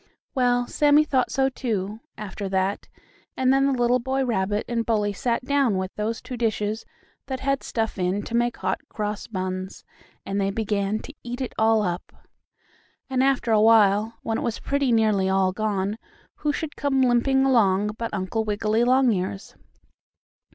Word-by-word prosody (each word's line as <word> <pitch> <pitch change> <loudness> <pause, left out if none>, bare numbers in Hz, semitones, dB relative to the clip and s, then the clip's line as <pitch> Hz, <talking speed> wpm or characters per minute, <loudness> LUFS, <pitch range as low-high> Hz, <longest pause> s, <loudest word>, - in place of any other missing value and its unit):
Well, 245 -1 +2
Sammie 295 +3 +4
thought 265 -4 +1
so, 270 0 +2
too, 215 -5 -3 0.2
after 200 -1 -5
that, 190 +1 -1 0.5
and 260 0 +3
then 275 0 +3
the 265 -3 0
little 245 +1 +3
boy 265 +2 -1
rabbit 205 -3 0
and 235 -1 -1
Bully 210 -3 0
sat 235 +4 -1
down, 275 -7 +2
with 185 0 -3
those 220 +2 -3
two 255 - -6
dishes, 220 -1 -1 0.4
that 265 -1 -4
had 275 0 0
stuff 225 -4 -3
in 185 +3 0
to - - -8
make 240 0 +1
Hot - - -1
Cross 210 -1 -4
Buns, 185 -2 -4 0.4
and 195 +1 -1
they 195 - +1
began 205 0 -1
to 285 - -10
eat 245 +1 -6
it 260 - -4
all 220 -1 +3
up. 180 -1 -3 1.0
And 260 -1 +2
after 270 -4 +1
awhile, 215 0 +4
when 225 0 -1
it - - -4
was 230 - -2
pretty 280 -2 0
nearly 215 -4 +3
all 190 -1 +2
gone, 205 +1 -2 0.4
who 300 - 0
should 300 0 -4
come 270 -2 +1
limping 265 +2 +3
along 210 -5 +3
but 230 -1 -2
Uncle 200 +3 -2
Wiggily 215 +2 +1
Longears. 235 -7 +1
225 Hz, 165 wpm, -24 LUFS, 200-255 Hz, 1.0 s, Sammie